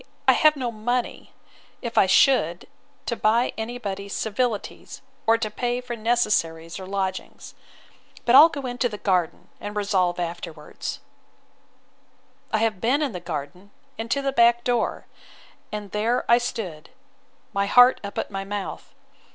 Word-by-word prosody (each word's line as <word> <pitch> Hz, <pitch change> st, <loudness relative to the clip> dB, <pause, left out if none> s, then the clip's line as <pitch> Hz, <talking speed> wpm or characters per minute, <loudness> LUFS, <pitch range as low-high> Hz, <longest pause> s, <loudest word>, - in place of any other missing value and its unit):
I -, -, +8 dB
have 310 Hz, 0 st, +5 dB
no 250 Hz, -4 st, -3 dB
money, 240 Hz, +3 st, -3 dB, 0.5 s
if 235 Hz, -1 st, -4 dB
I 190 Hz, -, +5 dB
should, 185 Hz, -, +3 dB, 0.4 s
to 235 Hz, -, -1 dB
buy 230 Hz, +3 st, +2 dB
any 230 Hz, +2 st, -4 dB
body's 200 Hz, -3 st, -5 dB
civilities, 220 Hz, 0 st, -3 dB, 0.2 s
or 225 Hz, 0 st, +5 dB
to 215 Hz, -2 st, -3 dB
pay 245 Hz, +2 st, -1 dB
for 250 Hz, -1 st, -6 dB
necessaries 210 Hz, -8 st, 0 dB
or 190 Hz, -, -8 dB
lodgings. 190 Hz, -1 st, -4 dB, 0.7 s
But 240 Hz, -, +3 dB
I'll 295 Hz, +5 st, +10 dB
go 285 Hz, -4 st, -6 dB
into 245 Hz, 0 st, -1 dB
the 210 Hz, -, -6 dB
garden, 185 Hz, -5 st, -1 dB
and 205 Hz, 0 st, -6 dB
resolve 190 Hz, -4 st, +1 dB
afterwards—— 170 Hz, -3 st, -6 dB, 1.5 s
I -, -, +2 dB
have 220 Hz, -3 st, 0 dB
been 270 Hz, +6 st, +2 dB
in 280 Hz, -, -1 dB
the 180 Hz, -, -6 dB
garden, 170 Hz, +3 st, -6 dB, 0.3 s
and 225 Hz, +1 st, -6 dB
to 280 Hz, +3 st, 0 dB
the 275 Hz, -, 0 dB
back 235 Hz, -2 st, +4 dB
door: 245 Hz, -2 st, -1 dB, 0.7 s
and 210 Hz, -2 st, -6 dB
there 225 Hz, +4 st, 0 dB
I 235 Hz, +1 st, +6 dB
stood, 190 Hz, -10 st, -5 dB, 0.6 s
my 200 Hz, 0 st, 0 dB
heart 245 Hz, +4 st, +6 dB
up 200 Hz, -, -7 dB
at -, -, -3 dB
my 195 Hz, 0 st, -3 dB
mouth. 200 Hz, 0 st, -6 dB
215 Hz, 150 wpm, -24 LUFS, 190-245 Hz, 1.5 s, I'll